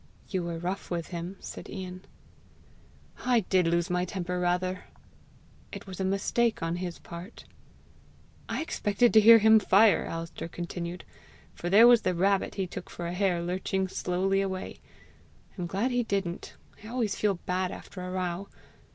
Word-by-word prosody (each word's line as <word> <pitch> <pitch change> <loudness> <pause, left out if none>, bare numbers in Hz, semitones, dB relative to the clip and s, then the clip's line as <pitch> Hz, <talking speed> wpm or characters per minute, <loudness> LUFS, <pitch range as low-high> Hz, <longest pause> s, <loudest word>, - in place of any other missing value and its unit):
"You 190 -3 -1
were 170 -1 -4
rough 180 +4 -4
with 170 -2 -3
him!" 175 +2 -6
said - - -9
Ian. 185 -2 -7 1.2
"I 245 -2 +3
did 185 -2 +2
lose 170 0 +1
my 180 0 +1
temper 180 -1 -3
rather." 180 +1 -1 0.9
"It - - -8
was 190 -2 -9
a - - 0
mistake 200 +3 0
on 165 +1 -1
his 175 -1 -4
part." 175 +6 -10 1.0
"I - - -1
expected 230 - +1
to 220 - +9
hear 230 +2 +9
him 220 0 +6
fire," 205 -1 +4
Alister 165 0 -5
continued, 175 +1 -6 0.5
"for 175 - -4
there 215 +5 +8
was 240 -2 +7
the 185 -1 0
rabbit 195 +2 +1
he 195 - -1
took 180 - -8
for 175 - -6
a 170 - -3
hare 180 -2 +1
lurching 190 +2 -1
slowly 190 +2 0
away! 190 -1 -4 0.8
I'm 180 -3 -4
glad 200 +9 -1
he 245 0 +2
didn't: 195 -6 -3 0.3
I - - -9
always 230 -3 -1
feel 205 -2 +1
bad 180 +1 -2
after 190 - -9
a 180 - -5
row! 185 +1 -3
185 Hz, 165 wpm, -28 LUFS, 175-200 Hz, 1.2 s, to